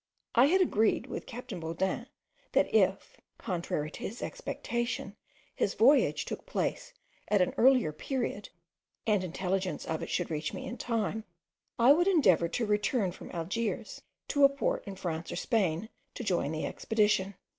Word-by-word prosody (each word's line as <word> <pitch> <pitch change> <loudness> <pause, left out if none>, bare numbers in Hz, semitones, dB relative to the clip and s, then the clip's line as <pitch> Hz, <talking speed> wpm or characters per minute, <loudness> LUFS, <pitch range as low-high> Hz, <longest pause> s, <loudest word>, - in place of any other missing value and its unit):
I 245 - +6
had 370 +6 +4
agreed 225 - +2
with - - -6
captain 245 -5 -7
Baudin, 185 +8 -2 0.5
that - - +2
if, - - +2 0.2
contrary 170 -6 -3
to - - -9
his 230 - -5
expectation, 240 - -3 0.4
his 200 - -1
voyage 265 +7 +4
took - - -6
place - - -2 0.4
at 205 - +3
an 180 - +2
earlier 255 - +5
period, 240 - -3 0.6
and 210 -4 +2
intelligence 185 +1 -2
of 160 -1 -2
it - - -5
should 175 -2 -1
reach 150 -1 -2
me - - -6
in 245 - -6
time, 220 -2 -1 0.5
I 245 +3 +7
would 350 +4 +2
endeavour 200 - +4
to 230 +7 -1
return 210 -1 +1
from - - -11
Algiers 190 +7 -3 0.3
to 285 - +2
a 275 - +9
port 275 0 -1
in 195 - -5
France 165 -3 -4
or - - -4
Spain, 190 -2 0 0.3
to - - -5
join 180 -8 0
the 160 0 -2
expedition. 210 -3 +1
210 Hz, 160 wpm, -30 LUFS, 180-245 Hz, 0.6 s, a